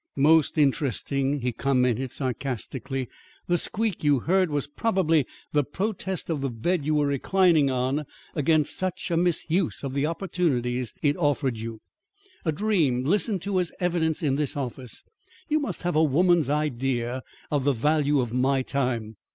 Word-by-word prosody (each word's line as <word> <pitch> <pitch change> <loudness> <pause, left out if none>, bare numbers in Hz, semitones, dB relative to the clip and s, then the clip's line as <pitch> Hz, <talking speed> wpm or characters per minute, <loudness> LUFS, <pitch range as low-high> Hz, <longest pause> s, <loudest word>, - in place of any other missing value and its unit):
"Most 155 +2 +4
interesting," 140 -1 +1
he 125 0 0
commented 125 0 +1
sarcastically. 130 0 -3 0.4
"The 175 -1 +1
squeak 215 -6 -2
you 145 -4 +3
heard 185 +3 +2
was 145 -2 -1
probably 165 - +1 0.3
the 145 -1 +3
protest 190 +3 -3
of 160 -4 -2
the 135 - -1
bed 150 +8 -1
you 155 +2 +1
were 150 -1 +3
reclining 155 +1 +3
on 130 +3 0 0.3
against 155 0 +2
such 185 0 -3
a - - +2
misuse 175 0 +1
of 135 -1 -3
the 140 +2 +1
opportunities 130 - -1
it 145 -1 +3
offered 145 -6 +1
you. 115 0 -7 0.6
A 160 - +2
dream 155 - +1
listened 200 - +1
to 195 -1 0
as 180 -2 -1
evidence 170 -3 0
in 140 -2 +1
this 145 -1 -1
office! 130 -2 -5 0.5
You 310 0 +3
must 285 - -4
have 175 -1 -1
a 155 - +5
woman's 165 0 +3
idea 130 -4 -1 0.3
of 145 -3 +1
the 140 +1 +3
value 145 +2 +2
of 120 -2 -4
my 130 +1 +2
time." 120 -6 -2
145 Hz, 160 wpm, -26 LUFS, 130-170 Hz, 0.6 s, a